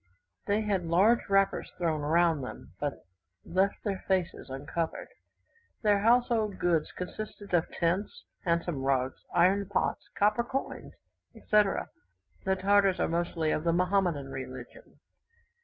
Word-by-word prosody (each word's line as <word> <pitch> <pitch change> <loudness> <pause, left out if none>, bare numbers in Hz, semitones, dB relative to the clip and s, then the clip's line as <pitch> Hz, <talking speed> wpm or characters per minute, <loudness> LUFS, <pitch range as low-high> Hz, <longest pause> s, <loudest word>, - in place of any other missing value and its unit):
They 205 +2 +2
had 205 -3 0
large 195 +9 +3
wrappers 195 0 +2
thrown 165 -4 0
round 160 -1 +2
them; 125 - -9
but 145 -1 -4 0.4
left 190 +3 0
their 195 -3 -3
faces 185 -6 -1
uncovered. 145 +5 -4 0.7
Their 205 -2 +4
household 225 -2 +2
goods 165 -3 +1
consisted 205 +1 -7
of 170 -2 +2
tents, 190 - -1 0.2
handsome 170 -4 0
rugs, 130 -1 0
iron 190 +3 +3
pots, 200 - -1
copper 210 +3 +2
coins, 270 +3 -5 0.4
etc. 210 -2 +1 0.6
The 190 0 +2
Tartars 195 0 +3
are - - +2
mostly 165 -2 -1
of 155 - -1
the 170 -1 +2
Mahomedan 180 -6 +1
religion. 135 - -9
185 Hz, 125 wpm, -29 LUFS, 165-205 Hz, 0.7 s, Their